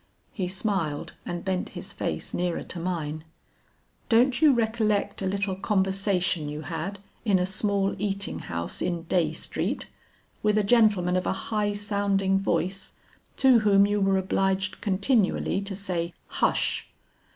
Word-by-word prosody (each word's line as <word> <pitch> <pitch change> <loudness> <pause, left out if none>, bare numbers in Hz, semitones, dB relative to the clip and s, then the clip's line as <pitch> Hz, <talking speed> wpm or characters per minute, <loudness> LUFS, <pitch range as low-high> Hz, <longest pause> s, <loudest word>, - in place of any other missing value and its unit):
He 185 -3 -3
smiled 185 -6 -2
and 175 +1 -4
bent 185 -1 -1
his - - -6
face - - -4
nearer 175 -1 -1
to 175 - -6
mine. 160 -3 -3 0.9
'Don't 245 +4 +4
you 310 -2 +7
recollect 220 -4 0
a 190 - -1
little 195 0 -1
conversation 190 -4 +1
you 150 +1 -5
had 165 +5 -4 0.3
in 205 -4 +3
a 180 - +1
small 200 0 +1
eating 200 -1 -2
house 85 0 -4
in 170 -2 -1
Dey 175 0 +1
Street, - - -3 0.6
with 210 0 +2
a 210 - +3
gentleman 205 -5 +4
of 185 - 0
a - - +1 0.2
high 210 -1 +1
sounding 200 -2 +1
voice 190 +1 -1 0.4
to 260 -3 +6
whom 200 -2 +5
you 205 0 0
were 195 0 +3
obliged 190 0 0
continually 200 -1 +1
to 200 0 -5
say 175 -3 -3
'hush!'" - - 0
195 Hz, 145 wpm, -26 LUFS, 180-205 Hz, 0.9 s, you